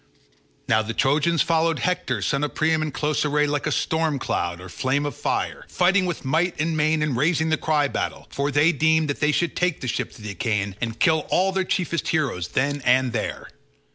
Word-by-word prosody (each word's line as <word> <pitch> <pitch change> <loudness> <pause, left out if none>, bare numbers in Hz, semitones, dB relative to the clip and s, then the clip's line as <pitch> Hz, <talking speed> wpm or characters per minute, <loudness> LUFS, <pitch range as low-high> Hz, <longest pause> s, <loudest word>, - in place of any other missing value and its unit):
Now 110 -3 +3
the 110 +1 -5
Trojans 155 +4 +2
followed 165 -1 +1
Hector 180 0 -1
son 140 0 0
of 150 - -3
Priam 160 0 +2
in 155 -1 -2
close 150 +1 -1
array 150 0 +2
like 145 -1 -1
a - - 0
storm 160 -2 0
cloud 85 -8 -2
or 90 - -9
flame 135 +9 -1
of 145 - -4
fire, - - -2
fighting 185 +1 +2
with 170 -5 -4
might 165 +5 0
and 160 +1 0
main 155 0 +2
and 150 -4 -1
raising 160 +4 +1
the 160 - +3
cry 150 -2 +1
battle; - - -4
for 140 +1 -1
they 145 +3 +4
deemed 160 0 +2
that 145 - -2
they 150 - +2
should 170 +3 0
take 180 -4 0
the 130 - -5
ships - - -3
of 105 - -13
the 105 - -5
Achaeans 100 0 -1
and 115 -1 -3
kill 160 -3 +2
all 190 +1 +2
their 190 0 0
chiefest 175 -3 -1
heroes 130 - 0
then 145 +6 -1
and 125 0 +3
there. 110 - -3
150 Hz, 215 wpm, -23 LUFS, 130-160 Hz, -, they